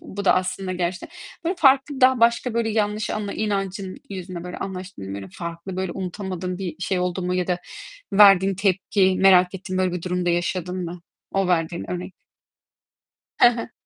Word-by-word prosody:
bu 200 +1 -7
da - - +5
aslında 185 +1 -2
gerçekten, 180 0 -3 0.4
böyle 345 +3 0
farklı 270 -1 +4
daha 255 -1 +5
başka 235 +1 +3
böyle 230 -1 +1
yanlış 215 -1 0
anla 210 -2 -3
inancın 195 -2 -3
yüzünden 180 -2 -6
böyle 180 0 -6
anlaştın 190 - -6
mı? 95 - -5
Böyle 100 -1 -7
farklı, 170 +2 -6
böyle 185 -2 -2
unutamadığın 185 -1 -4
bir 180 -5 -5
şey 180 +1 -1
oldu 180 +1 -1
mu 180 0 -1
ya 180 -1 0
da 180 -1 0 0.5
verdiğin 195 -1 +7
tepki 190 0 +2
merak 185 -1 +6
ettiğin 185 0 -4
böyle 185 -1 +1
bir 180 -2 -4
durumda 180 0 -1
yaşadın 180 +1 -2
mı? 170 0 -7 0.3
O 195 -1 +1
verdiğin 170 0 -1
örnek 180 +1 -5 1.3
Hı - - +9
hı. 230 -1 -5
185 Hz, 175 wpm, -23 LUFS, 180-200 Hz, 1.3 s, Hı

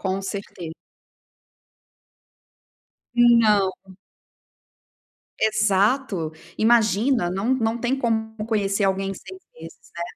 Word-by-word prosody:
Com 190 0 -2
certe 190 -4 -6 2.4
Não. 230 -5 +4 1.7
Exato! 215 - +1 0.2
Imagina, 225 -1 +2
não 195 +6 -2
não 225 -2 -1
tem 250 +3 -1
como 220 -2 -1
conhecer 200 -2 0
alguém 195 0 0
em - - -5
6 375 - -12
meses, 165 +1 -13
né. 170 - -3
215 Hz, 90 wpm, -23 LUFS, 195-235 Hz, 2.4 s, Não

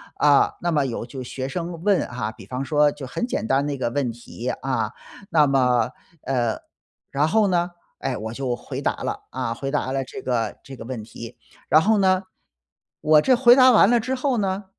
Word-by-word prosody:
啊， 145 -2 +4
那 175 - 0
么 145 -4 +2
有 115 -3 -4
就 130 +1 -7
学 130 +1 -5
生 170 +3 -5
问 200 -2 +3
啊， 115 -3 -4
比 - - -14
方 130 +1 -4
说 150 0 +3
就 145 -2 -8
很 240 - -3
简 240 - -3
单 135 +3 +2
的 145 - -2
一 - - -5
个 130 - -1
问 130 -1 -1
题， 120 +1 -7
啊， 135 0 -1 0.4
那 155 -6 +4
么 125 -3 +2 0.3
呃， 120 -4 -1 0.5
然 145 +2 +1
后 210 +5 +3
呢， 175 -1 0 0.3
哎， - - -2
我 110 +1 -5
就 125 -1 -2
回 - - -7
答 - - +1
了， - - -3
啊， 115 - -2
回 135 +3 -5
答 145 -3 -1
了 135 0 -1
这 130 - -9
个 120 -3 -2
这 135 - -10
个 115 - -10
问 120 -3 -5
题。 115 +1 -10 0.3
然 155 - +6
后 215 +5 +3
呢， 190 -1 +3 0.8
我 155 0 +5
这 255 +10 +4
回 245 -1 +7
答 255 -1 +7
完 215 -3 +6
了 240 0 +4
之 250 +4 -3
后 260 -1 0
呢， 195 -1 -1
140 Hz, 225 characters per minute, -23 LUFS, 125-185 Hz, 0.8 s, 回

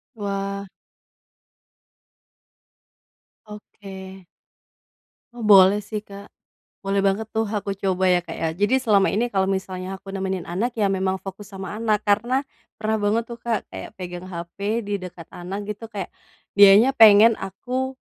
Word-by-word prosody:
Wah. 200 -1 -4 2.8
Oke. 195 -3 -11 1.1
Oh, 240 - -10
boleh 200 -1 +6
sih, 210 +1 -6
Kak. 200 0 -11 0.5
Boleh 195 0 0
banget 210 +3 0
tuh, 220 0 -1
aku 205 -2 -3
coba 190 -1 -1
ya, 180 -1 +4
Kak, - - -8
ya. 165 - -2
Jadi 260 +6 +3
selama 205 -5 +3
ini 235 +4 0
kalau 190 -3 +1
misalnya 190 -1 -3
aku 195 - -16
nemenin 190 -2 -4
anak, 220 +8 -1
ya 200 - +3
memang 190 0 -1
fokus 195 +1 -9
sama 195 0 -7
anak 215 -2 +1
karena, 235 +5 +2 0.5
pernah 220 0 0
banget 220 +3 +2
tuh, 235 - -7
Kak, 230 -3 -2
kayak - - -9
pegang 180 -1 -7
hape 185 +5 -4
di 205 -1 -3
dekat 180 -3 -10
anak 180 +3 -7
gitu, 210 +2 -6
kek 200 -3 -4 0.5
dianya 205 +5 +8
pengen 220 +1 +8
aku, 250 +8 -4
200 Hz, 145 wpm, -23 LUFS, 190-215 Hz, 2.8 s, dianya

